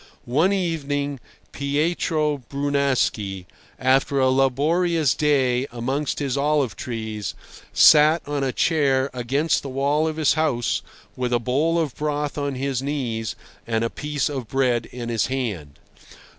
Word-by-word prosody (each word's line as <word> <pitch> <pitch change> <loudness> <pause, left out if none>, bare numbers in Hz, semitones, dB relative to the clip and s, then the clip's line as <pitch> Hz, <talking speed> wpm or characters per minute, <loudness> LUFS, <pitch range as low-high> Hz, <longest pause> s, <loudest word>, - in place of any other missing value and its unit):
One 155 +10 +2
evening 145 -7 -1 0.3
Pietro 150 +1 0
Brunaschi, 140 -9 0 0.3
after 135 +1 +2
a 130 -1 +4
laborious 150 +3 +2
day 135 -3 +1
amongst 130 +5 -2
his 140 -3 -1
olive 140 -4 +1
trees, 110 -5 -5 0.4
sat 155 +1 +6
on 145 -1 -1
a 135 - 0
chair 140 -3 +1
against 135 +6 0
the 140 - -6
wall 140 +4 +1
of 155 - -2
his 155 -2 +3
house 150 -7 0 0.3
with 125 -1 -2
a 120 - +3
bowl 145 +8 +1
of 160 -5 0
broth 150 -1 -2
on 140 -1 -2
his 135 -1 -2
knees 125 -6 -3 0.3
and 115 -1 0
a 115 - -1
piece 150 -2 -2
of 135 -5 -4
bread 125 -2 +1
in 120 -1 -7
his 115 -2 0
hand. 105 - -4
140 Hz, 140 wpm, -23 LUFS, 125-150 Hz, 0.4 s, sat